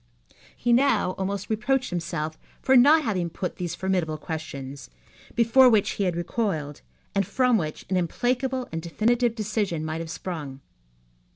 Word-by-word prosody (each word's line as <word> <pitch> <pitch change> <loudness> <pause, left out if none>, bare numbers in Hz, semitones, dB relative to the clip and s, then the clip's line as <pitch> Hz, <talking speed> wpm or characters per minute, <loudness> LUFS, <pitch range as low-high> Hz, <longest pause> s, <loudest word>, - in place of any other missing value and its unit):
He 240 0 +2
now 265 -6 +3
almost 195 +1 -2
reproached 240 +3 0
himself 160 -3 -3 0.2
for 265 - +3
not 295 +6 +7
having 185 -8 -1
put 180 +2 -5
those 175 -1 -3
formidable 180 -5 -1
questions, 140 -4 -7 0.5
before 245 +3 +6
which 215 -4 +3
he 200 - -1
had 180 -2 0
recoiled, 170 - -2 0.3
and 195 -1 +2
from 250 +5 +2
which 155 -7 -2
an 190 - 0
implacable 250 +8 -1
and 165 - -3
definitive 230 +7 +1
decision 205 -7 -2
might 160 +1 -3
have 165 - -6
sprung. 150 -7 -6
190 Hz, 150 wpm, -25 LUFS, 165-240 Hz, 0.5 s, not